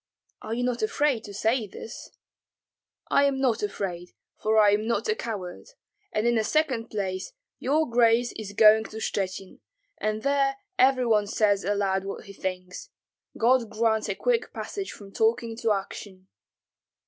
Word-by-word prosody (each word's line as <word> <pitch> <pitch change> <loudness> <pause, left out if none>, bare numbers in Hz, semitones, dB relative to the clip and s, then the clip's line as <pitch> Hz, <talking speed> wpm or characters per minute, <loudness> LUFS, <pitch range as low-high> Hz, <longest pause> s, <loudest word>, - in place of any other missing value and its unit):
"Are 220 +1 -4
you 245 - -1
not 245 -1 -1
afraid 245 +2 +1
to 205 - -8
say 220 +2 +1
this?" 220 - -9 1.0
"I 280 - +4
am 275 -1 +1
not 250 -5 +1
afraid, 180 -4 -4 0.2
for 220 +1 +1
I 210 -1 +6
am 210 +2 +1
not 235 - 0
a 440 - +3
coward, 205 - -6 0.4
and 215 - 0
in 240 - +3
the 225 -2 +2
second 260 -4 0
place 190 - -3 0.3
your 305 +4 +1
grace 235 0 +3
is 205 -2 -7
going 220 +1 +6
to 220 - -9
Shchuchyn, 195 -3 -3 0.4
and 215 0 -2
there 275 0 +2 0.2
every 255 -1 +4
one 210 -3 +3
says 205 -1 +2
aloud 195 -1 0
what 195 +2 -6
he 200 - -10
thinks. 185 -1 -5 0.5
God 240 0 +3
grant 220 -1 +1
a 195 - -1
quick 470 - 0
passage 395 -1 -5
from 200 -2 -12
talking 225 +2 +1
to 230 -1 +1
action." 195 -1 -5
220 Hz, 160 wpm, -26 LUFS, 200-245 Hz, 1.0 s, I